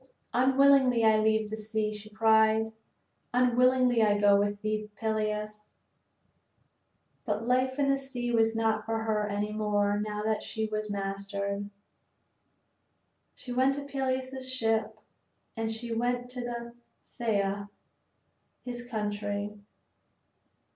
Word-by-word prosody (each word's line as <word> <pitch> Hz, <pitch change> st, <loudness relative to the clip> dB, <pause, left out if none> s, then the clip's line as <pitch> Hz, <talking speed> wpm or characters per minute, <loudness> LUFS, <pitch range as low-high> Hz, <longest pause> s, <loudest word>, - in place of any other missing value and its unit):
"Unwillingly 260 Hz, -1 st, +4 dB
I 220 Hz, 0 st, +5 dB
leave 220 Hz, 0 st, +1 dB
the -, -, -2 dB
sea," 215 Hz, 0 st, -2 dB
she 210 Hz, 0 st, -10 dB
cried, 220 Hz, 0 st, +3 dB, 0.6 s
"unwillingly 250 Hz, -1 st, +4 dB
I 205 Hz, -1 st, +4 dB
go 205 Hz, -1 st, +5 dB
with 205 Hz, 0 st, +1 dB
thee, 215 Hz, 0 st, -2 dB
Peleus." 215 Hz, -1 st, -3 dB, 1.5 s
But 215 Hz, -1 st, -2 dB
life 255 Hz, +1 st, +1 dB
in 285 Hz, -1 st, +2 dB
the 275 Hz, 0 st, +2 dB
sea 250 Hz, -3 st, -4 dB
was 225 Hz, -1 st, +3 dB
not 220 Hz, -1 st, +1 dB
for 225 Hz, 0 st, -2 dB
her 215 Hz, -1 st, 0 dB
any 205 Hz, +1 st, -2 dB
more 205 Hz, -1 st, +1 dB
now 210 Hz, 0 st, -3 dB
that 220 Hz, 0 st, 0 dB
she 220 Hz, 0 st, -3 dB
was 215 Hz, 0 st, -3 dB
mastered. 200 Hz, 0 st, -3 dB, 1.7 s
She 250 Hz, -, -9 dB
went 260 Hz, +2 st, +3 dB
to 285 Hz, 0 st, -5 dB
Peleus's 260 Hz, -1 st, -2 dB
ship 225 Hz, -3 st, 0 dB, 0.6 s
and 225 Hz, -1 st, -2 dB
she 230 Hz, +1 st, -4 dB
went 245 Hz, +1 st, -1 dB
to 240 Hz, -1 st, -5 dB, 0.3 s
Phthia, 205 Hz, -4 st, -2 dB, 1.0 s
his 240 Hz, -1 st, -5 dB
country. 205 Hz, -2 st, -3 dB
220 Hz, 120 wpm, -29 LUFS, 210-245 Hz, 1.7 s, I